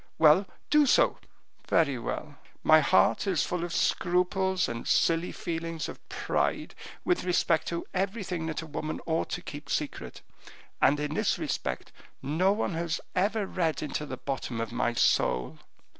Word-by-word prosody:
"Well, 160 +5 +6 0.2
do 300 -1 +5
so." - - +4 0.5
"Very 140 -6 +3
well; 150 +5 -4 0.3
my 155 0 +7
heart 115 - +3
is 180 -7 +2
full 175 -1 -2
of 175 - -4
scruples 180 +2 +1
and 115 0 -5
silly 165 +1 +2
feelings 165 -1 -4
of - - -11
pride, - - -1 0.3
with 360 -1 +1
respect 170 -3 +1
to 170 0 -3
everything 190 -3 -2
that 160 0 -3
a - - -7
woman 155 0 -4
ought 165 0 0
to 175 - -4
keep 150 -4 -8
secret, 140 - -3 0.6
and 145 +2 +4
in 150 0 -2
this - - +1
respect 65 -1 -3 0.3
no 160 +8 +2
one 205 -2 -1
has 165 0 -2 0.2
ever 205 +3 +1
read 165 -5 -1
into 150 0 -3
the 130 - -5
bottom 130 -3 -4
of 115 0 -3
my 120 0 0
soul." 75 - +1
165 Hz, 160 wpm, -28 LUFS, 145-180 Hz, 0.6 s, my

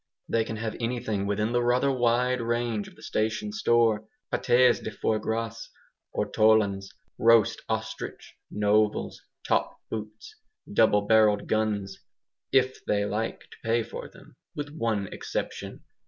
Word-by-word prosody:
They 115 - +1
can 110 - -5
have 110 0 -4
anything 115 -4 -2
within 105 +2 0
the 120 0 +2
rather 125 +3 +2
wide 125 0 +2
range 115 -2 -1
of - - -14
the - - -17
station 110 -1 -1
store. 110 0 +2 0.3
PATES 125 +1 +4
DE - - -5
FOIE 110 0 -1
GRAS, 115 +1 -3 0.5
ortolans, 105 -3 +2 0.3
roast 115 -2 +4
ostrich, - - -4 0.2
novels, 105 0 +1 0.3
top - - +1
boots, 110 0 -7 0.4
double 105 - +4
barrelled 105 -1 +4
guns, 105 -3 -1 0.5
IF 130 -1 +2
THEY 100 -1 +1
LIKE 105 +2 -2
TO - - -16
PAY 115 +1 +1
FOR - - -8
THEM - - -18 0.2
with 145 0 -5
one 110 -9 0
exception. - - -5
110 Hz, 135 wpm, -27 LUFS, 105-120 Hz, 0.5 s, PATES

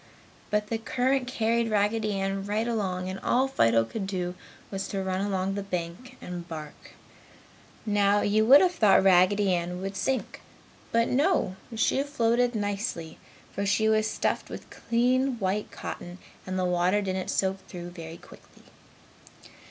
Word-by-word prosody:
But 210 0 0
the 225 - -1
current 255 +3 0
carried 230 -1 0
Raggedy 210 0 +1
Ann 195 0 -2
right 215 +3 0
along 190 -6 -2
and 190 +1 -5
all 260 +2 +2
Fido 115 - +3
could 195 - -5
do 180 -2 -2 0.4
was 195 -1 -3
to 195 -1 -3
run 190 0 -1
along 195 -1 -1
the 200 - -3
bank 190 +6 -5
and 175 -1 -7
bark. 155 -3 -9 0.9
Now, 205 -1 +3
you 215 +1 +2
would 275 +4 +9
have 360 -1 +3
thought 210 - +5
Raggedy 190 +1 +4
Ann 175 +1 -2
would 195 +1 -5
sink, 265 +5 -2 0.5
but 230 0 +3
no, 280 - +1 0.2
she 230 +4 +2
floated 245 -3 +1
nicely, 200 -6 -3 0.3
for 200 - -2
she 205 +2 +2
was 215 0 +2
stuffed - - -1
with - - -9
clean 250 +2 +1
white 200 0 -1
cotton 175 +1 -7 0.3
and 185 0 -2
the 185 - +1
water 180 +3 +2
didn't 185 -1 -3
soak 190 0 0
through 175 -1 -8
very 165 -1 -9
quickly. - - -17
200 Hz, 155 wpm, -27 LUFS, 185-230 Hz, 0.9 s, would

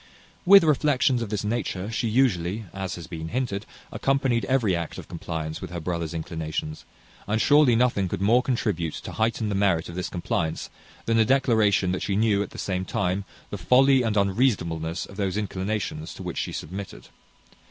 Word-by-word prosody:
With 195 -1 +9
reflections 140 -4 +2
of 115 - -3
this 105 -1 -2
nature 105 -2 -2
she 115 +1 -1
usually, 110 -4 +1
as 95 -2 -4
has 85 - -8
been 80 0 -6
hinted, 110 -2 -3 0.2
accompanied 135 -4 +1
every 120 -8 +2
act 85 -1 -4
of - - -9
compliance 80 -2 -5
with 95 - -6
her 85 0 -5
brother's 85 -1 -3
inclinations; 80 -1 -4 0.4
and 105 +2 +1
surely 145 -2 +5
nothing 115 -5 +2
could - - -3
more 110 +6 +4
contribute 105 - -1
to - - -7
heighten 110 -1 0
the - - -1
merit 95 -5 +1
of - - -7
this 90 0 -3
compliance 85 -2 -2 0.3
than 115 0 +2
a - - +6
declaration 110 -7 +3
that 90 - -2
she 100 - -1
knew, 105 -1 +2
at 100 - -3
the - - -12
same 95 -1 -2
time, 95 +1 -1 0.3
the - - -4
folly 135 +1 +5
and 110 -3 0
unreasonableness 95 -6 0
of 100 - -13
those 100 -1 -1
inclinations 95 -5 -3
to - - -8
which - - -4
she - - -3
submitted. 95 +5 -7
100 Hz, 185 wpm, -25 LUFS, 85-115 Hz, 0.4 s, With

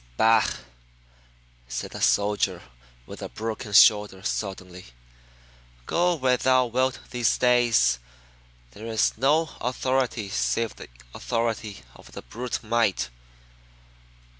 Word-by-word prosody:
"Bah!" 110 0 +4 1.2
said 60 -1 -5
the - - -8
soldier 105 0 +1 0.4
with - - -10
the - - -6
broken 110 -1 -5
shoulder 105 -2 +5
suddenly. 95 - -5 1.0
"Go 175 +1 +1
where 130 -4 +1
thou 130 0 +3
wilt 130 +2 -1
these 120 -2 +1
days 120 - +3 0.7
there 110 - -10
is 110 -1 +1
no 150 +7 +2
authority 130 -3 -1
save 115 +2 -1
the - - -11 0.2
authority 115 -3 -3
of - - -16 0.2
brute 120 +1 -4
might. 110 - 0
115 Hz, 105 wpm, -25 LUFS, 105-125 Hz, 1.2 s, shoulder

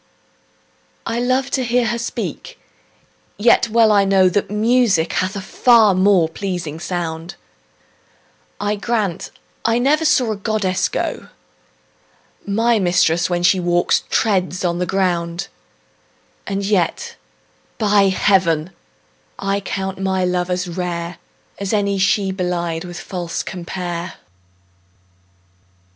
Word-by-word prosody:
I 230 +1 -2
love 255 +2 0
to 260 - 0
hear 245 0 +1
her 235 +1 -1
speak, 230 - -5 0.8
yet 230 +2 +4
well 225 -1 +4
I 200 -1 +4
know 195 -1 +4
That 200 +1 -1
music 210 -5 +2
hath 185 +1 -1
a 200 - -4
far 225 +1 +4
more 185 -2 +4
pleasing 165 -3 -5
sound: 170 -2 -4 1.2
I 205 0 -1
grant 205 -3 -2 0.3
I 230 0 +2
never 290 +6 +2
saw 255 -7 +2
a - - -2
goddess 195 -3 -1
go; - - -3 1.2
My 225 +3 +2
mistress, 175 -2 +2
when 175 -1 -1
she 185 +1 +4
walks, 175 0 +2
treads 185 -4 0
on 175 0 0
the 180 - -1
ground: 175 -1 -1 1.0
And 195 0 -2
yet 195 -5 0 0.6
by 205 -2 +3
heaven, 185 -4 +2 0.7
I 195 0 -1
think 190 -1 -4
my 190 -1 0
love 180 0 -1
as 180 0 -1
rare, 170 -1 -4 0.4
As 200 +1 -3
any 200 -2 +1
she 195 0 +2
belied 175 -2 -2
with 175 0 -8
false 175 -3 -4
compare. 175 -1 -5
190 Hz, 120 wpm, -19 LUFS, 175-210 Hz, 1.2 s, yet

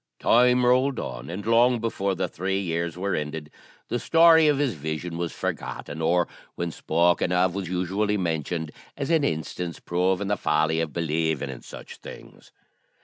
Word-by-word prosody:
Time 125 +1 +4
rolled 130 +2 +3
on, - - -6
and 95 +4 -6
long 120 +2 +4
before 100 -4 -1
the - - -1
three 95 +2 -2
years 85 -2 -2
were 100 +2 -1
ended 75 0 -4 0.4
the 120 - -2
story 165 +1 +6
of 145 -2 +3
his 140 -4 +1
vision 80 +2 -4
was 85 0 -3
forgotten, 80 - -5
or, 85 +2 +2 0.3
when 85 -1 -3
spoken 85 +3 +1
of, 90 0 +2
was 95 -3 -4
usually 95 +4 0
mentioned 80 -2 -2 0.3
as 140 +3 -2
an 160 -3 +3
instance 85 - -3
proving 95 +3 0
the 105 - +1
folly 80 +1 +1
of 80 -2 -3
believing 80 -3 -1
in 65 - -9
such - - -11
things. - - -13
90 Hz, 165 wpm, -25 LUFS, 80-110 Hz, 0.4 s, story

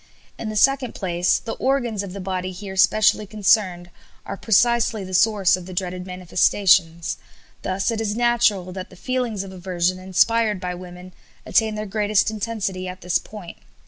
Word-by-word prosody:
In 220 - -4
the 215 - -5
second 265 +2 +2
place, 175 -2 +1
the 225 - -6
organs 245 -6 -1
of 200 -2 -7
the 200 - -7
body 185 -1 -3
here 190 +1 -8
specially 215 +2 +3
concerned 195 -4 +1 0.3
are - - -5
precisely 235 +1 +2
the 185 0 -8
source 205 -1 +4
of 185 -1 -9
the 185 - -8
dreaded 180 0 -4
manifestations. 180 -2 +2 0.4
Thus 190 +4 -1
it 225 -1 -2
is 210 -1 -2
natural 235 -6 +2
that 185 0 -7
the - - -15
feelings 245 -2 -2
of 195 - -9
aversion 185 -1 -1
inspired 210 +3 +2
by 180 -1 -4
women 180 0 -10 0.3
attain 220 -1 +2
their 215 0 -4
greatest 210 +1 +1
intensity 205 -4 -3
at 180 0 -8
this 180 0 +1
point. 205 -6 -11
195 Hz, 170 wpm, -22 LUFS, 185-220 Hz, 0.4 s, source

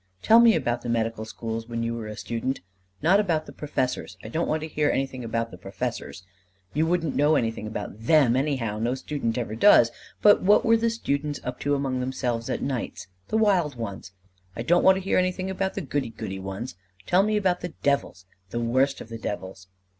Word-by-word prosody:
"Tell 225 +1 +7
me 235 -2 +7
about 120 -5 -1
the 120 - -5
medical 115 -1 -1
schools 115 0 -5
when 115 0 -2
you 115 0 -1
were 115 -2 -5
a 105 - -7
student. 130 +3 -3 0.4
Not 185 +5 +5
about 165 -7 +1
the - - -10
professors. 130 -9 -3
I 110 - -7
don't 160 +8 -1
want 155 0 0
to 155 - -4
hear 150 -1 +1
anything 135 -2 -2
about 115 0 -2
the 90 - -11
professors. 95 - -5 0.5
You 155 +3 +1
wouldn't 165 -4 0
know 150 +2 +4
anything 115 -4 -1
about 105 -1 -6
them, 130 -1 +4
anyhow: 130 -6 -1
no 120 +3 0
student 130 -4 -3
ever 115 -3 -3
does. 115 - +6 0.3
But 205 -1 +7
what 205 +3 +4
were 230 - +5
the 230 0 +2
students 145 -10 -2
up 125 0 -5
to 145 0 +1
among 135 -2 -1
themselves 125 -2 -2
at - - -2
nights? 130 -6 -4 0.2
The 220 - 0
wild 185 -10 +2
ones. 100 -5 -6 0.4
I 115 - -4
don't 175 +7 +3
want 190 - +7
to 190 - -4
hear 190 - +2
anything 185 +1 -1
about 190 0 -2
the 195 - -2
goody 145 -7 -2
goody 95 -3 -6
ones. 95 +6 -5 0.3
Tell 180 - +4
me 215 +1 +1
about 185 -3 +1
the 175 -1 -6
devils 140 -9 0 0.2
the 120 - -3
worst 130 +4 +1
of - - -10
the 115 0 -7
devils." 95 -3 -6
130 Hz, 210 wpm, -26 LUFS, 115-165 Hz, 0.5 s, Tell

